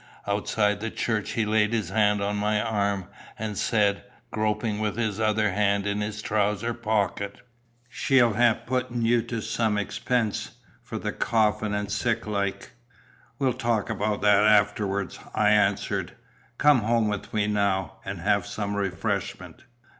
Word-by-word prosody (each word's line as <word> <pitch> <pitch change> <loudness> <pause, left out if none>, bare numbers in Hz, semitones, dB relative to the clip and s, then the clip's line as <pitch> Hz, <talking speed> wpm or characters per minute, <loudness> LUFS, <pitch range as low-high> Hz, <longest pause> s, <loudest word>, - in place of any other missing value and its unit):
Outside 105 0 0
the 110 +1 -3
church, 110 -3 -2
he 115 - 0
laid 105 +1 +2
his 110 -7 -1
hand 105 -1 +2
on 100 +1 -1
my 105 +1 +1
arm, 100 -3 -1 0.3
and 110 -1 -4
said, 100 -1 +1 0.3
groping 110 0 -1
with 105 0 -2
his 110 -3 -1
other 110 -1 +2
hand 100 0 +1
in 100 0 -1
his 105 +1 -4
trousers 105 +2 0
pocket 100 -2 -1 0.5
"She'll 125 -2 +3
hae 120 +1 +3
putten 125 -2 -1
ye 120 0 +3
to 115 -1 -4
some 110 -1 0
expense 105 +2 -1 0.3
for - - -6
the - - -3
coffin 110 -2 +1
an' 105 -1 -2
sic 115 +2 -1
like." 100 -2 -3 0.7
"We'll 135 -3 +1
talk 115 -4 -1
about 105 0 -1
that 105 0 +5
afterwards," 100 -2 +2 0.2
I - - +4
answered. - - +1 0.4
"Come 145 -3 +5
home 115 0 +1
with 100 -2 -4
me 105 -1 +1
now, 100 -2 0
and 95 -3 -6
have 100 0 +1
some 100 -1 -3
refreshment." 95 -4 -3
105 Hz, 150 wpm, -26 LUFS, 100-110 Hz, 0.7 s, that